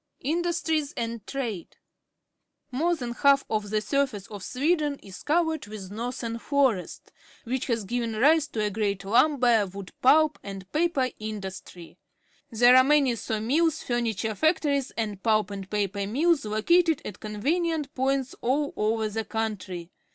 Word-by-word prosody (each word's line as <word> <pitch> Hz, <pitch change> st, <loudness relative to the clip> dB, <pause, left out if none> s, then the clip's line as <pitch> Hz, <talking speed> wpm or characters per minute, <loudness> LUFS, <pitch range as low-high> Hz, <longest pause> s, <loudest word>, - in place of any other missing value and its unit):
Industries 320 Hz, -1 st, -1 dB
and 230 Hz, -2 st, -4 dB
Trade. 230 Hz, -10 st, -5 dB, 0.5 s
— -, -, -53 dB
More 345 Hz, +1 st, +3 dB
than 245 Hz, -6 st, -5 dB
half 275 Hz, +3 st, +3 dB
of 210 Hz, -2 st, -1 dB
the 215 Hz, 0 st, 0 dB
surface 220 Hz, -2 st, -1 dB
of 205 Hz, -1 st, -9 dB
Sweden 295 Hz, +2 st, 0 dB
is 195 Hz, -1 st, -10 dB
covered 320 Hz, -4 st, 0 dB
with 205 Hz, -3 st, -8 dB
northern 230 Hz, +1 st, -4 dB
forest, 265 Hz, -9 st, 0 dB, 0.3 s
which 255 Hz, +2 st, -3 dB
has 230 Hz, -4 st, 0 dB
given 230 Hz, +2 st, -2 dB
rise 305 Hz, +7 st, +4 dB
to 220 Hz, -7 st, -3 dB
a 210 Hz, -, 0 dB
great 200 Hz, -1 st, -2 dB
lumber, 240 Hz, -1 st, +3 dB
wood 195 Hz, 0 st, -9 dB
pulp, 310 Hz, +3 st, +4 dB
and 195 Hz, -2 st, -8 dB
paper 300 Hz, -6 st, +1 dB
industry. 190 Hz, -5 st, -8 dB, 0.5 s
There 245 Hz, +1 st, +6 dB
are 255 Hz, -, +8 dB
many 280 Hz, -2 st, +3 dB
saw 220 Hz, -1 st, -3 dB
mills, 315 Hz, +8 st, +1 dB
furniture 225 Hz, -3 st, -1 dB
factories, 290 Hz, -, +1 dB
and 210 Hz, -4 st, -3 dB
pulp 215 Hz, -2 st, +2 dB
and 195 Hz, -1 st, -7 dB
paper 200 Hz, -1 st, -1 dB
mills 295 Hz, +5 st, +2 dB
located 320 Hz, +10 st, +2 dB
at 190 Hz, -, -7 dB
conven 275 Hz, +12 st, -1 dB
ient 300 Hz, -3 st, -4 dB
points 270 Hz, -1 st, 0 dB
all 285 Hz, +4 st, 0 dB
over 220 Hz, +1 st, 0 dB
the 220 Hz, +1 st, -3 dB
country. 200 Hz, -6 st, -4 dB
235 Hz, 150 wpm, -26 LUFS, 210-285 Hz, 0.5 s, are